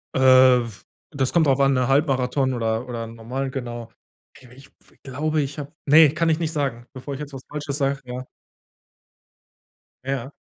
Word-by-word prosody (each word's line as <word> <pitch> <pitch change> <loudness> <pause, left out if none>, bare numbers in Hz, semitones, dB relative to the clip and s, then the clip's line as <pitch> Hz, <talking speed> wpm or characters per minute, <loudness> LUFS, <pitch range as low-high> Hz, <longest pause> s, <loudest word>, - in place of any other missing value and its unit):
Äh, - - +1 0.5
w 110 -4 -12 0.3
das 135 -3 -1
kommt 165 -3 +3
drauf 135 0 +3
an, 135 0 +4
ne, 130 -1 +1
Halbmarathon 135 -2 +1
oder 115 +1 -2
oder 115 -2 -4
'n 115 +1 -11
Normal 130 +4 -4
genau. 120 -4 -6 0.5
Ich 130 - -17
ich 135 +2 -16 0.3
glaube, 150 +3 -1
ich 140 +2 -5
habe 145 0 -7
ne, 150 +1 +7
kann 165 +1 +1
ich 160 +1 +1
nicht 160 -1 -2
sagen, 135 -6 -3
bevor 135 +2 -7
ich 135 - -6
jetzt 145 -1 -8
was 130 - -8
Falsches 145 -1 -4
sage, 140 -1 0
ja. 125 +1 -6 1.8
Ja. 135 0 -4
135 Hz, 180 wpm, -23 LUFS, 125-145 Hz, 1.8 s, ne